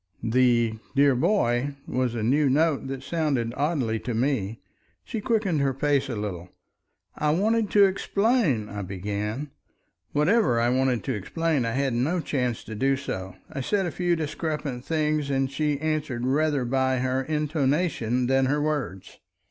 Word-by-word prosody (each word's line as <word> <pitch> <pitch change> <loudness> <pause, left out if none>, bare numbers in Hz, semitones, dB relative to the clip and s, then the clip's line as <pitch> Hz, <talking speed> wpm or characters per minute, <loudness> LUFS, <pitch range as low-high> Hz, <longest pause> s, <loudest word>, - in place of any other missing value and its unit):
The 120 -1 +2 0.2
"dear 140 0 +5
boy" 130 - +1
was 125 -2 -1
a 110 - -2
new 140 +5 +3
note, 150 0 +2
that 135 -1 -5
sounded 140 -9 -1
oddly 140 -7 0
to 120 0 -4
me. 115 -4 -1 0.4
She 225 -3 -4
quickened 205 - +1
her 135 -2 +1
pace 140 0 +1
a 120 - -2
little. 95 -4 -5 0.7
"I 150 - 0
wanted 210 +6 +2
to 205 -1 +6
explain—" 195 - +1
I 105 -1 -5
began. 105 +8 -4 0.6
Whatever 150 - +3
I 120 +1 +2
wanted 130 -1 +1
to 130 - -2
explain 145 - -1
I 115 - -1
had 135 0 0
no 140 +10 +1
chance 125 -7 -2
to 110 - -8
do 135 +5 +1
so. 95 -9 -5 0.2
I 140 - -4
said 195 +8 0
a 175 - -2
few 175 0 +1
discrepant 150 -4 -3
things 155 -2 0
that 135 -1 0
she 150 +1 0
answered 150 -6 -2
rather 145 0 +1
by 130 +1 +1
her 130 +1 0
intonation 145 -4 0
than 135 +1 +2
her 145 +3 +1
words. 145 -11 -3
135 Hz, 160 wpm, -26 LUFS, 120-155 Hz, 0.7 s, to